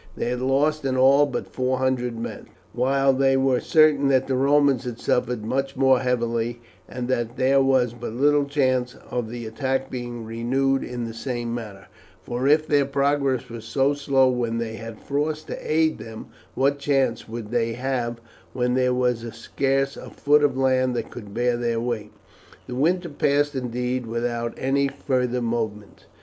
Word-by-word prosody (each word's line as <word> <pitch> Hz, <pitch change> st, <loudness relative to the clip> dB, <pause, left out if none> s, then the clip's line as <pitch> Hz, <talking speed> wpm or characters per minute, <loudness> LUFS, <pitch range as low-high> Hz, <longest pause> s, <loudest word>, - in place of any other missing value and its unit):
They -, -, -1 dB
had 125 Hz, 0 st, -2 dB
lost 145 Hz, +4 st, +1 dB
in 130 Hz, -1 st, 0 dB
all 135 Hz, +3 st, +5 dB
but 125 Hz, -3 st, -4 dB
four 130 Hz, 0 st, -1 dB
hundred 125 Hz, -2 st, -1 dB
men, 115 Hz, -, -6 dB, 0.3 s
while 135 Hz, +2 st, +2 dB
they 135 Hz, 0 st, +3 dB
were 135 Hz, -2 st, +2 dB
certain 155 Hz, -4 st, +4 dB
that 135 Hz, -1 st, +3 dB
the 135 Hz, -, -2 dB
Romans 140 Hz, -1 st, +3 dB
had 120 Hz, -2 st, -5 dB
suffered 125 Hz, -3 st, 0 dB
much 135 Hz, +3 st, -1 dB
more 130 Hz, -1 st, +4 dB
heavily, 120 Hz, -1 st, -1 dB, 0.3 s
and 125 Hz, -1 st, -4 dB
that 120 Hz, -1 st, -2 dB
there 135 Hz, +1 st, +4 dB
was 130 Hz, -3 st, +2 dB
but 120 Hz, -1 st, -6 dB
little 145 Hz, +3 st, +3 dB
chance 130 Hz, -3 st, 0 dB, 0.2 s
of 120 Hz, -3 st, -2 dB
the 120 Hz, 0 st, -6 dB
attack 130 Hz, +4 st, -2 dB
being 120 Hz, -2 st, -5 dB
renewed 130 Hz, +4 st, 0 dB
in 125 Hz, -1 st, -5 dB
the 115 Hz, -, -6 dB
same 120 Hz, 0 st, -4 dB
manner, 105 Hz, -5 st, -7 dB, 0.4 s
for 125 Hz, +2 st, -2 dB
if 155 Hz, +2 st, +4 dB
their 145 Hz, -2 st, +3 dB
progress 140 Hz, -2 st, 0 dB
was 115 Hz, -2 st, -8 dB
so 135 Hz, +5 st, +1 dB
slow 140 Hz, -2 st, +2 dB
when 120 Hz, -2 st, 0 dB
they 115 Hz, -1 st, -3 dB
had 115 Hz, -1 st, -8 dB
frost 150 Hz, +2 st, -2 dB
to -, -, -5 dB
aid 160 Hz, 0 st, +2 dB
them, 110 Hz, 0 st, -9 dB, 0.3 s
what 140 Hz, +1 st, +1 dB
chance 135 Hz, -6 st, 0 dB
would 115 Hz, -1 st, -6 dB
they 115 Hz, -1 st, 0 dB
have 120 Hz, -1 st, -2 dB, 0.3 s
when 125 Hz, -1 st, 0 dB
there 125 Hz, 0 st, +2 dB
was 125 Hz, -2 st, +1 dB, 0.2 s
scarce 135 Hz, +3 st, -1 dB
a -, -, -9 dB
foot 150 Hz, +1 st, +3 dB
of 135 Hz, -3 st, +2 dB
land 130 Hz, -1 st, +2 dB
that -, -, -4 dB
could 105 Hz, -4 st, -9 dB
bear 120 Hz, +3 st, +1 dB
their 120 Hz, -1 st, -1 dB
weight? 115 Hz, -3 st, -3 dB, 0.5 s
The 125 Hz, -, -7 dB
winter 170 Hz, +7 st, +1 dB
passed, 145 Hz, 0 st, +1 dB
indeed, 125 Hz, -1 st, -2 dB
without 115 Hz, 0 st, -2 dB
any 140 Hz, +1 st, +1 dB
further 125 Hz, -2 st, -1 dB
movement. 110 Hz, -3 st, -4 dB
130 Hz, 175 wpm, -24 LUFS, 120-135 Hz, 0.5 s, all